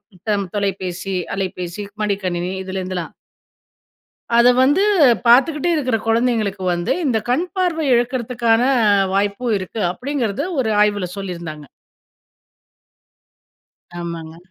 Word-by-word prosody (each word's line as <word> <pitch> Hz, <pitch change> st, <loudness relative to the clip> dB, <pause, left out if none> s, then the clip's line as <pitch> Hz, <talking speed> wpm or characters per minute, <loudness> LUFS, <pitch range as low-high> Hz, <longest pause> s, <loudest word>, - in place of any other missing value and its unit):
நித்தம் 200 Hz, +2 st, -2 dB
தொலைபேசி, 190 Hz, -2 st, -3 dB, 0.2 s
அலைபேசி, 185 Hz, 0 st, -4 dB, 0.2 s
மடிக்கணினி 185 Hz, -4 st, -1 dB
இதிலேருந்துலாம். 185 Hz, -2 st, -5 dB, 1.2 s
அத 235 Hz, +1 st, +6 dB, 0.2 s
வந்து 290 Hz, +9 st, +3 dB, 0.4 s
பார்த்துக்கிட்டே 275 Hz, +7 st, +4 dB
இருக்கிற 255 Hz, -7 st, 0 dB
குழந்தைகளுக்கு 225 Hz, -4 st, +1 dB
வந்து, 175 Hz, 0 st, -2 dB
இந்த 250 Hz, -5 st, +2 dB
கண் 280 Hz, +9 st, +2 dB
பார்வை 345 Hz, -5 st, 0 dB
இழக்கிறதுக்கான 235 Hz, -1 st, +1 dB, 0.5 s
வாய்ப்பும் 205 Hz, +4 st, 0 dB
இருக்கு. 190 Hz, +4 st, -6 dB
அப்பிடிங்கிறது, 255 Hz, -, -2 dB
ஒரு 230 Hz, -, +1 dB
ஆய்வுல 205 Hz, -3 st, +1 dB
சொல்லியிருந்தாங்க. 170 Hz, -6 st, -6 dB, 2.3 s
ஆமாங்க. 165 Hz, -1 st, -6 dB
205 Hz, 90 wpm, -19 LUFS, 185-245 Hz, 2.3 s, அத